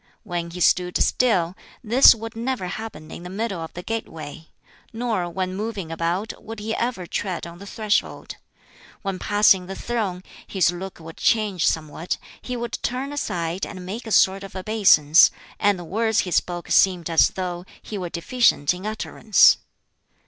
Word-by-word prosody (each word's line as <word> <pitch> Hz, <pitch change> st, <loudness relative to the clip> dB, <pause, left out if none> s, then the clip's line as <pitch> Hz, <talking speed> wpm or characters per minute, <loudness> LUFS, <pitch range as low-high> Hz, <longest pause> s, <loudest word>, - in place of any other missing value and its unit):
When 175 Hz, -5 st, -4 dB
he 175 Hz, +1 st, -8 dB
stood 180 Hz, +1 st, +3 dB
still, 185 Hz, -8 st, +2 dB, 0.3 s
this 240 Hz, +3 st, +7 dB
would 225 Hz, 0 st, -8 dB
never 240 Hz, -3 st, -2 dB
happen 180 Hz, -5 st, -7 dB
in -, -, -8 dB
the 180 Hz, -, -8 dB
middle 200 Hz, -1 st, -3 dB
of 160 Hz, -, -6 dB
the 175 Hz, -, -6 dB
gateway; 160 Hz, -9 st, -6 dB, 0.4 s
nor 225 Hz, -6 st, -2 dB
when 185 Hz, +1 st, -3 dB
moving 200 Hz, -5 st, -4 dB
about 170 Hz, +6 st, -3 dB
would 225 Hz, 0 st, -8 dB
he 220 Hz, +2 st, -3 dB
ever 230 Hz, -7 st, -2 dB
tread 180 Hz, 0 st, -3 dB
on 170 Hz, 0 st, -10 dB
the 200 Hz, -, -10 dB
threshold. 215 Hz, -1 st, -2 dB, 0.7 s
When 195 Hz, -2 st, -3 dB
passing 205 Hz, -3 st, +4 dB
the 195 Hz, -, -6 dB
throne, 200 Hz, -7 st, -3 dB, 0.2 s
his 185 Hz, -3 st, +2 dB
look 185 Hz, +2 st, -7 dB
would 165 Hz, 0 st, -11 dB
change 210 Hz, -6 st, +1 dB
somewhat, 160 Hz, +2 st, -2 dB, 0.2 s
he 250 Hz, -1 st, -4 dB
would 235 Hz, -1 st, -4 dB
turn 265 Hz, +3 st, -3 dB
aside 175 Hz, -, -3 dB
and 185 Hz, -2 st, -5 dB
make 225 Hz, +6 st, -6 dB
a -, -, -5 dB
sort 195 Hz, -1 st, +4 dB
of 195 Hz, -1 st, -10 dB
obeisance, 185 Hz, -6 st, +5 dB, 0.3 s
and 205 Hz, -1 st, +3 dB
the 175 Hz, -, -7 dB
words 220 Hz, +4 st, +1 dB
he 180 Hz, -, -5 dB
spoke 175 Hz, 0 st, -1 dB
seemed 180 Hz, -4 st, +4 dB
as 165 Hz, -1 st, +5 dB
though 180 Hz, -2 st, -4 dB, 0.2 s
he 215 Hz, -, -8 dB
were 180 Hz, -3 st, -4 dB
deficient 170 Hz, -, +2 dB
in 185 Hz, +3 st, -6 dB
utterance. 215 Hz, -1 st, +4 dB
190 Hz, 170 wpm, -23 LUFS, 175-220 Hz, 0.7 s, this